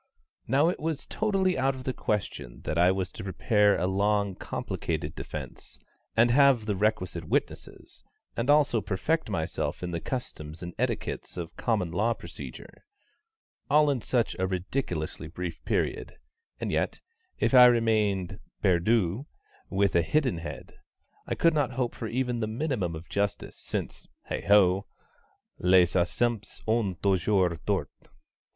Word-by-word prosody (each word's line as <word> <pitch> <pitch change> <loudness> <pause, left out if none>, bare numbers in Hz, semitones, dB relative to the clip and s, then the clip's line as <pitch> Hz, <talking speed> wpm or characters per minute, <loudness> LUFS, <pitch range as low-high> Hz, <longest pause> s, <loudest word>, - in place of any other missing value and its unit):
Now 140 +6 +4
it 180 - -3
was 155 -2 -3
totally 195 -6 0
out 135 +1 +2
of 130 - -8
the 130 - -2
question 105 - -3
that 75 - -3
I 90 +2 +5
was 95 -1 -2
to - - -8
prepare 105 +2 +2
a 90 - 0
long 100 +1 +1
complicated - - -4
defence, - - -8 0.4
and 120 +1 +5
have 135 -4 +5
the 105 -2 0
requisite 90 -5 -1
witnesses, - - -3 0.3
and 115 +4 -2
also 145 -6 +4
perfect 155 +11 -1
myself 80 -2 -2
in 90 - -3
the 85 - -2
customs 80 - -5
and 85 0 -6
etiquettes - - -3
of 85 -2 -6
Common 105 -8 0
Law 110 +7 +1
Procedure, - - -10 0.9
all 150 0 +5
in 130 -4 -1
such 120 +1 0
a 95 - +1
ridiculously 90 - -3
brief 85 +1 -6
period; - - -1 0.4
and - - -2
yet, - - -1 0.4
if - - +1
I 125 -1 +10
remained 105 -5 +1 0.2
perdu 100 - +2 0.4
with 100 0 +1
a 85 - +5
hidden 130 - +1
head, 85 - -8 0.5
I - - -1
could 165 -1 +3
not 145 -4 0
hope 125 -1 -1
for 115 - -5
even 125 0 -1
the 110 - -1
minimum 110 - -2
of 80 +2 -9
justice, 100 0 -2
since, - - -5 0.2
heigh - - -4
ho! 100 -2 +5 0.7
les 90 -1 +4
absents 105 +4 0
ont 110 -6 0
toujours 95 -3 +2
tort. - - 0
105 Hz, 145 wpm, -28 LUFS, 90-125 Hz, 0.9 s, I